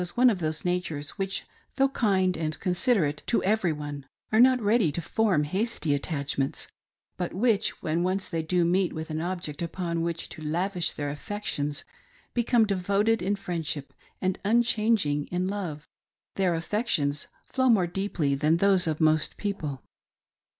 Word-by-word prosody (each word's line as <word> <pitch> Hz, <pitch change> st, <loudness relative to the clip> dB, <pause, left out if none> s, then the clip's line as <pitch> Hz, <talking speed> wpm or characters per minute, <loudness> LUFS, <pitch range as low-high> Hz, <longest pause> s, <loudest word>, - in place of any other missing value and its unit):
one 250 Hz, 0 st, +6 dB
of 195 Hz, -, -2 dB
those 155 Hz, -1 st, -3 dB
natures 165 Hz, -5 st, -1 dB
which, 195 Hz, 0 st, -2 dB, 0.3 s
though 270 Hz, 0 st, +3 dB
kind 190 Hz, -8 st, +2 dB
and 155 Hz, -1 st, -3 dB
considerate^ 180 Hz, -, +1 dB
tq 235 Hz, -, +2 dB
e^i^ery 195 Hz, -3 st, +2 dB
one, 145 Hz, -2 st, -6 dB, 0.2 s
are 220 Hz, -, +4 dB
not 255 Hz, +1 st, +6 dB
ready 210 Hz, -6 st, +3 dB
to 170 Hz, -, -3 dB
form 185 Hz, -2 st, +1 dB
hasty 185 Hz, -1 st, -1 dB
attachments, 140 Hz, -2 st, -2 dB, 0.5 s
but 180 Hz, -1 st, -3 dB
which, 215 Hz, 0 st, +1 dB
when 160 Hz, +2 st, 0 dB
once 185 Hz, +2 st, 0 dB
they 165 Hz, -3 st, -2 dB
do 175 Hz, +2 st, +1 dB
meet 180 Hz, +1 st, +2 dB
with 160 Hz, 0 st, -5 dB
an 155 Hz, +1 st, -2 dB
object 175 Hz, -4 st, -4 dB
upon 170 Hz, 0 st, -2 dB
which 170 Hz, 0 st, -2 dB
to, -, -, -10 dB
lavish 175 Hz, +3 st, 0 dB
their 145 Hz, -1 st, -3 dB
affections, 150 Hz, -3 st, -3 dB, 0.5 s
become 240 Hz, -1 st, +3 dB
devoted 200 Hz, +3 st, +1 dB
in 195 Hz, +3 st, +1 dB
friendship 165 Hz, -7 st, -3 dB, 0.3 s
and 185 Hz, -1 st, -1 dB
unchanging 215 Hz, -9 st, +2 dB
in 180 Hz, +1 st, -1 dB
love. 180 Hz, -7 st, -4 dB, 0.5 s
Their 185 Hz, -3 st, +1 dB
affections 165 Hz, -, 0 dB, 0.2 s
flow 260 Hz, -1 st, +1 dB
more 205 Hz, -6 st, +5 dB
deeply 175 Hz, -5 st, -1 dB
than 150 Hz, +4 st, +2 dB
those 190 Hz, -1 st, +3 dB
of 155 Hz, 0 st, -1 dB
most 155 Hz, -1 st, +2 dB
people. 155 Hz, -, -4 dB
180 Hz, 155 wpm, -27 LUFS, 155-205 Hz, 0.5 s, one